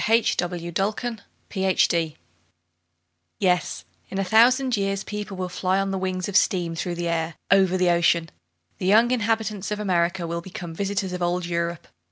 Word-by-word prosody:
IN 225 - +2 0.3
A 175 -1 -4
THOUSAND 215 +4 -2 0.3
YEARS 175 -5 +2 1.2
Yes, 180 -2 0 0.2
in 195 - -5
a 195 - +1
thousand 245 +6 +4
years 195 -1 -1
people 210 -2 -6
will 185 0 -2
fly 185 +1 0
on 195 0 -1
the 190 - -2
wings 185 -1 -2
of 200 - -5
steam 175 -4 +2
through 175 +1 -3
the 170 0 -2
air, 165 -1 -1 0.2
over 190 -1 +4
the 180 -1 +3
ocean! 170 -1 +2 0.5
The 185 - -2
young 225 +5 +5
inhabitants 220 -4 -1
of 210 0 -3
America 180 -2 0
will 170 0 -3
become 175 -2 -8
visitors 195 +1 -2
of 180 - -4
old 175 0 0
Europe. 170 -1 -3
185 Hz, 170 wpm, -24 LUFS, 170-200 Hz, 1.2 s, young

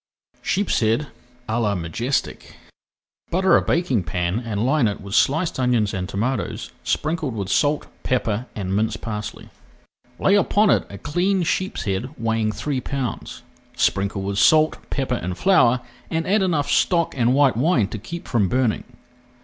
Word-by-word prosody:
SHEEPSHEAD 120 - +1 0.4
À 115 +2 0
LA 105 -2 +1
MAJESTIC 95 - -3 0.7
Butter 190 +2 +3
a - - +5
baking 160 - +1
pan 90 +3 -1
and 115 -2 -2
line 135 -2 +3
it 100 - -3
with 100 0 -8
sliced 155 +7 +2
onions 120 -5 +1
and 90 -1 -3
tomatoes, 115 +3 -2
sprinkled 155 -5 -1
with 100 -3 -4
salt, 145 +5 +2 0.2
pepper, 115 -1 -1
and 95 -2 -2
minced 110 +2 -1
parsley. 105 -2 -6 0.7
Lay 195 - +3
upon 205 +1 +4
it - - +2
a 100 - -8
cleaned 175 - 0
sheepshead 125 - -2
weighing 110 -1 0
three 135 +3 -3
pounds. 130 -8 -4 0.3
Sprinkle 95 0 0
with 100 0 -2
salt, 155 +4 +5
pepper, 130 -3 -1
and 90 0 -4
flour, 125 -11 +4 0.3
and 165 0 -1
add 205 +3 +2
enough 160 -7 +1
stock 170 -2 +2
and 125 0 +2
white 140 -4 +4
wine 125 - +2
to 110 - -5
keep 170 +11 -8
from 105 -6 +1
burning. 125 -4 0
120 Hz, 150 wpm, -22 LUFS, 105-155 Hz, 0.7 s, a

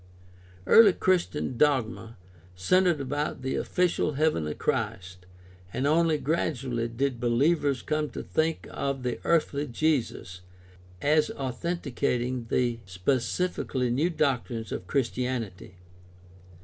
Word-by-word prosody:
Early 220 -4 +7
Christian 175 -9 0
dogma 115 -5 +1 0.4
centered 175 - +3
about 140 0 -3
the 130 - -1
ofhcial 175 -4 0
heavenly 135 - 0
Christ 90 0 -3 0.4
and 130 - -2
only 160 +1 +3
gradually 135 -6 -1
did 125 +1 -2
behevers 140 +3 +1
come 155 -1 -1
to - - -6
think 160 +1 -1
of 140 -2 -3
the 125 -1 -2
earthly 150 -3 +1
Jesus 120 - -1 0.6
as 150 +1 +3
authenticating 130 -3 -2
the 120 -2 +1
spe 95 +8 0
cifically 130 -4 -1
new 145 +8 +1
doctrines 130 - -1
of 90 - -5
Christianity. 120 -6 -2
135 Hz, 110 wpm, -27 LUFS, 120-155 Hz, 0.6 s, Early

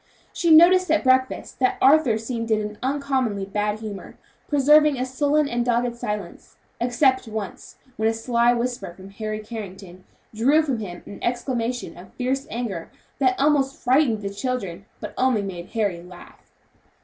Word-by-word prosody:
She 340 - 0
noticed 350 +3 +7
at 315 0 +2
breakfast 260 -1 +1
that 255 -1 +2
Arthur 275 -5 +5
seemed 230 0 -4
in 220 -1 +2
an 210 0 -6
uncommonly 260 -7 -1
bad 210 +2 -2
humor, 210 -3 -8 0.3
preserving 295 0 +4
a 255 - -1
sullen 290 +3 +1
and 240 -2 -1
dogged 240 0 0
silence, 210 -6 -6 0.2
excepting 250 -1 +1
once 205 -3 -6 0.2
when 220 +1 +2
a - - 0
sly 235 +1 +2
whisper 240 -6 -3
from 190 +1 -12
Harry 215 +1 -5
Carrington 195 -4 -9 0.3
drew 275 +9 +3
from 270 -6 -2
him 180 -5 -7
an 200 - -10
exclamation 240 -5 -2
of 180 +2 -13
fierce 265 +2 -2
anger 215 -8 -4 0.3
that 255 -2 +2
almost 275 -1 +2
frightened 250 -5 +2
the 200 - -3
children, 200 -5 -4
but - - -7
only 255 -5 +2
made 180 -3 -6
Harry 205 -7 -2
laugh. 180 0 -15
240 Hz, 160 wpm, -23 LUFS, 210-265 Hz, 0.3 s, noticed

